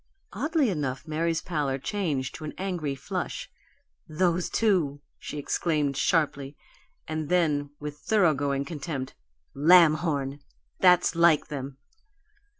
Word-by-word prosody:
Oddly 285 - +1
enough, 145 -3 -3
Mary's 165 +1 -1
pallor 145 -6 -1
changed 145 -5 -2
to - - -9
an 155 - -6
angry 175 -7 -3
flush. 135 - -5 0.6
"Those 175 +2 +1
two!" 175 -11 +1 0.2
she - - -7
exclaimed, 145 -1 0
sharply; 145 -1 0 0.5
and 155 -1 -3
then, 150 -5 +1
with 150 0 -6
thoroughgoing 145 -9 +1
contempt: 140 -3 -5 0.4
"Lamhorn! 155 -3 +4 0.4
That's 180 -1 +5
like 170 -3 +4
them!" 135 -2 -6
155 Hz, 110 wpm, -27 LUFS, 140-175 Hz, 0.6 s, That's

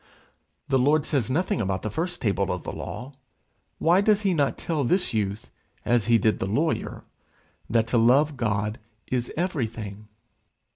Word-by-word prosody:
The 135 -2 +2
Lord 145 +4 +3
says 130 -6 0
nothing 155 -2 0
about 95 -2 -2
the 110 - -3
first 175 - -3
table 100 -3 +1
of 90 -1 -4
the - - -4
law: 130 +3 -7 0.6
why 175 +4 +4
does 210 0 +3
he 195 -3 +2
not 145 -4 +1
tell 155 -4 -1
this 180 +2 +1
youth 105 -1 -2 0.3
as 120 -3 +2
he 115 -1 +5
did 110 -1 +1
the 95 - -1
lawyer, 150 +11 -1 0.7
that 115 -1 +3
to 120 - +3
love 140 +6 +4
God 105 -1 -1 0.3
is 125 -2 -2
everything? 115 - -3
120 Hz, 160 wpm, -25 LUFS, 110-155 Hz, 0.7 s, he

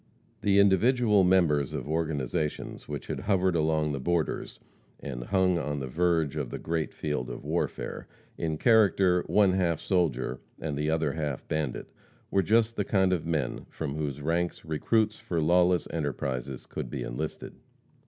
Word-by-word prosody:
The 100 -1 +3
individual 105 +2 +4
members 85 -7 +3
of - - -4
organizations 80 -1 -2
which - - -5
had - - -4
hovered 95 -3 +1
along 80 -1 +1
the 70 - -3
borders, 85 +3 -1 0.4
and 60 -4 -6
hung 95 -1 +2
on 75 -2 -3
the 70 - -3
verge 80 +1 +1
of 75 -5 -3
the - - -5
great 80 -1 -2
field 75 -5 -3
of - - -7
warfare, - - -3 0.3
in 80 -2 -2
character 95 -4 +4
one 100 -3 +4
half 90 -4 +1
soldier 70 -9 0 0.2
and 75 -3 -3
the 75 +2 -1
other 80 0 +1
half 75 -4 -4
bandit, 75 -5 -3 0.4
were 95 - +3
just 115 +4 +2
the 105 - +1
kind 95 -2 +2
of 85 -2 -2
men 80 -4 -2
from 75 -4 -4
whose 75 -2 -3
ranks 85 +2 -1
recruits 105 +8 +1
for 85 - -2
lawless 90 +2 +3
enterprises 65 -4 -3
could - - -6
be - - -4
enlisted. 75 +6 -5
80 Hz, 160 wpm, -28 LUFS, 75-95 Hz, 0.4 s, individual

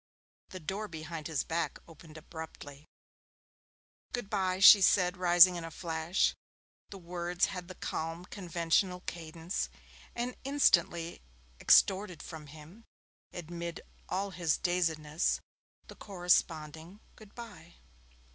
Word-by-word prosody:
The 185 - -8
door 195 +6 -4
behind 160 -2 -7
his 160 -4 -1
back 170 +1 -2
opened 160 -1 -14
abruptly. 155 -2 -10 1.3
'Goodbye,' 195 -6 -1
she 195 +1 +9
said, 180 -1 +4
rising 180 0 +6
in 170 - -6
a 165 - -6
flash. 165 +2 0 0.6
The 200 - -9
words 175 0 -1
had 180 -2 -7
the 185 - -9
calm 165 +2 -4
conventional 180 0 -1
cadence, 165 +1 -5 0.5
and 245 +1 -3
instantly 175 - +2 0.4
extorted 190 -4 +4
from 160 -3 -9
him 155 +9 -14 0.5
amid 170 0 -6 0.3
all 195 +2 -2
his 170 -4 0
dazedness 165 -3 0 0.5
the - - -12
corresponding 175 -2 -1 0.2
'Goodbye'. 205 -6 -12
175 Hz, 110 wpm, -31 LUFS, 160-185 Hz, 1.3 s, she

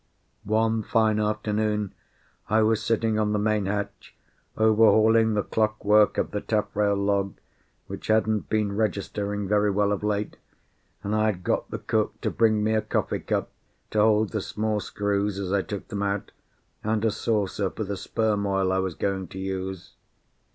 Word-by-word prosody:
One 110 +1 +2
fine 110 0 +2
afternoon 105 -1 -1 0.6
I 110 +1 +4
was 110 0 +2
sitting 115 -2 +1
on 105 -1 +1
the - - +1
main 105 -1 +1
hatch, 100 0 -4 0.4
overhauling 110 0 +5
the 105 - +1
clockwork 105 -1 +2
of - - -1
the 105 - -2
taffrail 105 -1 0
log, 100 -1 0 0.5
which - - -8
hadn't 110 -1 +1
been 105 -2 0
registering 105 -1 -2
very 105 +1 +2
well 100 +1 +1
of 100 - -1
late, 105 0 -1 0.7
and 100 - -2
I 110 0 +2
had 95 -4 -2
got - - -1
the - - -4
cook - - -1
to - - -1
bring 110 -2 +2
me 110 +1 +1
a 110 - +2
coffee 110 - -1
cup - - -2 0.4
to 110 - +1
hold 105 0 +4
the 110 - -2
small 105 +1 -2
screws 100 0 -1
as 100 -1 -3
I 100 - +3
took 100 +1 -7
them 105 -2 -3
out, 100 0 -2 0.5
and 110 +1 0
a 110 - +3
saucer 105 -2 -1
for 110 - -5
the 100 0 -3
sperm 105 +1 -1
oil 95 -1 +1
I 95 - +1
was 95 -3 -2
going 95 -2 -2
to 95 - -11
use. 95 -1 -4
105 Hz, 170 wpm, -25 LUFS, 100-110 Hz, 0.7 s, overhauling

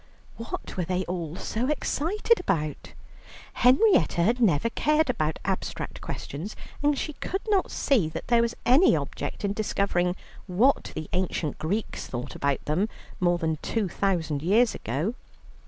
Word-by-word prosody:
What 230 - -6
were 180 - +1
they 180 +2 -1
all 170 -3 -4
so 235 +7 -2
excited 365 - +1
about? 155 - -2 0.6
Henrietta 265 - +4
had 235 +7 +2
never 215 -1 +3
cared 305 +1 +2
about 155 -8 -1
abstract 190 0 -3
questions, 165 +10 -6 0.3
and 290 -1 +2
she 305 - -3
could 385 +7 -4
not 395 -3 +2
see 225 - +2
that - - -6
there 235 -1 +4
was 235 0 0
any 275 +10 +6
object - - -4
in 200 - 0
discovering 195 -4 0 0.3
what 220 +10 +2
the 155 -1 -4
ancient 175 -5 -1
Greeks 200 +8 -2
thought 125 +1 -5
about 140 -1 -1
them 180 +9 +1 0.3
more 175 -1 +3
than 160 -2 -1
two 220 -4 -1
thousand 165 -6 0
years 220 +8 +4
ago. 145 - -2
195 Hz, 150 wpm, -27 LUFS, 165-250 Hz, 0.6 s, any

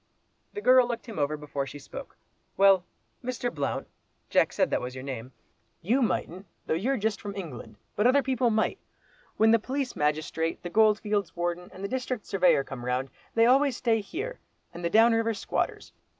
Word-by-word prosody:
The 415 - -5
girl 255 -4 +6
looked 235 -1 -4
him 225 -8 -7
over 150 +1 0
before 145 -2 -4
she 135 - -8
spoke. 140 - -10 0.4
"Well, 195 -2 +6 0.4
Mr. 245 0 -3
Blount 145 -3 -2 0.4
(Jack - - +4
said - - +1
that - - +1
was 125 +1 -6
your 130 - -7
name), 130 -2 -6 0.5
you 240 +10 +2
mightn't, 195 -5 -1 0.2
though - - 0
you're 245 +12 0
just 215 -1 -1
from 200 -1 -6
England, 130 - -7 0.2
but 210 - +3
other 275 +2 +4
people 255 -2 +1
might. 220 -1 0 0.6
When 220 +1 +5
the 230 - +5
police 265 +3 -3
magistrate, 155 +2 -1
the 175 - -5
Goldfields 210 -2 +2
Warden, 175 +1 -2
and 190 - -10
the - - -1
District 255 -1 -3
Surveyor 180 -7 +3
come 130 -2 -8
round, 125 +2 -1 0.2
they 230 0 +5
always 265 +1 +4
stay 225 -3 +1
here, 435 - -5 0.3
and 175 - -8
the 170 - +1
down 225 +4 +6
river 225 0 +1
squatters. 200 - -3
205 Hz, 185 wpm, -28 LUFS, 155-240 Hz, 0.6 s, girl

